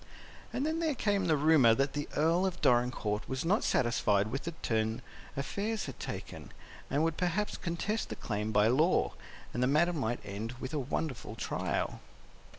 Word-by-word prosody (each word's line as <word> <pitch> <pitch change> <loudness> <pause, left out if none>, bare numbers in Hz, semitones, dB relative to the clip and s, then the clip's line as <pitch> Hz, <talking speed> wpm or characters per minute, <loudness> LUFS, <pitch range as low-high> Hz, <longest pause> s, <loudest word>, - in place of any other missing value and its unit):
And 270 - -1
then 320 +1 0
there 320 -4 +1
came 205 -4 +1
the 155 -2 +3
rumor 140 -6 +6
that 135 +2 0
the 145 0 -3
Earl 165 +4 +3
of 180 -2 -4
Dorincourt 120 -4 +1
was 130 +3 -2
not 195 +6 +2
satisfied 105 -3 +2
with 135 +3 -3
the 170 - -3
turn 110 0 0 0.3
affairs 205 +10 -2
had 135 - -8
taken, - - -6 0.4
and 145 +3 +1
would 165 -1 0
perhaps 180 +4 0
contest 195 +6 -2
the - - -4
claim 105 -1 -3
by 105 -1 +4
law, 150 +9 +3 0.4
and 120 - -1
the 125 - +4
matter 165 +6 +3
might 120 -7 -1
end 105 +4 -5
with 130 +2 -7
a 150 - 0
wonderful 130 -4 -3
trial. - - -2
140 Hz, 175 wpm, -31 LUFS, 115-175 Hz, 0.4 s, rumor